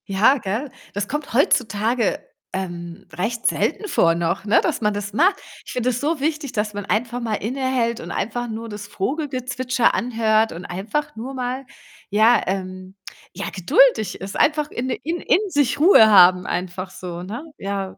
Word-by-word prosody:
Ja, 205 +8 +4
gell? 230 +5 -3 0.2
Das 205 0 -2
kommt 295 -2 -4
heutzutage, 230 -3 +1 0.3
ähm, 175 -2 -6
recht 230 +6 -3
selten 420 - 0
vor 165 - +3
noch, 170 +3 -1
ne, 215 +2 +4
dass - - -1
man 210 -1 +1
das 205 0 -5
macht. 365 - +4 0.3
Ich - - -8
finde 250 0 0
das 245 -1 -2
so 305 +2 0
wichtig, 295 -1 -2
dass 210 -3 -2
man 205 -1 -5
einfach 240 +4 -1
mal 225 -2 -1
innehält 245 0 -1
und 170 - -7
einfach 240 +2 -3
nur 225 +1 -5
das 205 -2 -8
Vogelgezwitscher 255 +1 -1
anhört 225 0 +1
und 170 +2 -8
einfach 210 +12 -3
nur 245 +5 -6
mal, 255 +1 -3 0.4
ja 220 +4 +4
ähm, 185 0 -4 0.4
ja 195 +2 -4
geduldig 215 +3 +3
ist, 195 +1 -7
einfach 300 0 +2
in 255 +2 -3
in 310 +7 -3
in - - +3
sich 285 -6 +1
Ruhe 310 - +7
haben 180 -3 +6
einfach 185 +1 -4
so, 180 -2 -7
ne? 215 +9 -6
Ja. 195 -1 -4
220 Hz, 170 wpm, -22 LUFS, 195-255 Hz, 0.4 s, Ruhe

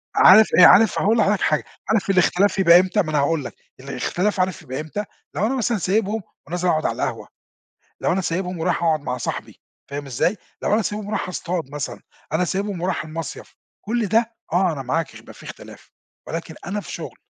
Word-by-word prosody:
عارف 220 0 +8
آآ، 180 - +10
عارف 225 +1 +6
هاقول 220 +4 +2
لحضرتك 205 -2 +2
حاجة، 155 - +1 0.3
عارف 215 -2 +1
الاختلاف 195 +1 +3
يبقى 175 -2 +7
إمتى 185 +3 +1
ما 165 - -4
أنا 150 - +2
هاقول 145 0 0
لك، - - -7 0.2
الإختلاف 180 +9 -2
عارف 185 0 0
يبقى 130 +1 -6
إمتى، 180 +7 -4 0.3
لو 210 - +1
أنا 260 - 0
مثلًا 235 -2 0
سايبهم 205 +3 0 0.3
ونازل 180 +3 -2
اقعُد 155 -2 +1
على - - -1
القهوة، - - -3 0.7
لو - - +1
أنا 190 - +1
سايبهم 180 0 -2
ورايح 170 +1 0
اقعُد 160 -2 +2
مع 125 -3 -3
صاحبي 120 - -5 0.3
فاهم 145 0 -5
إزاي؟ 140 - 0 0.3
لو - - +2
أنا 220 - +2
سايبهم 210 0 -4
ورايح 215 -3 -2
اصطاد 175 -5 -4
مثلًا، 145 -2 -5 0.3
أنا 165 +3 +2
سايبهم 195 0 -2
ورايح 180 -1 -1
المصيف، 160 -1 -7 0.3
كُلّ 230 +1 -1
ده 230 +3 +1 0.2
آه، 180 -1 +3
أنا 140 - -5
معاك 160 +5 -2
هيبقى - - -13
في - - -15
إختلاف، - - -12 0.4
ولكن 165 0 -5
أنا 205 +3 -2
في - - -9
شُغل. - - -7
180 Hz, 200 wpm, -22 LUFS, 160-205 Hz, 0.7 s, آآ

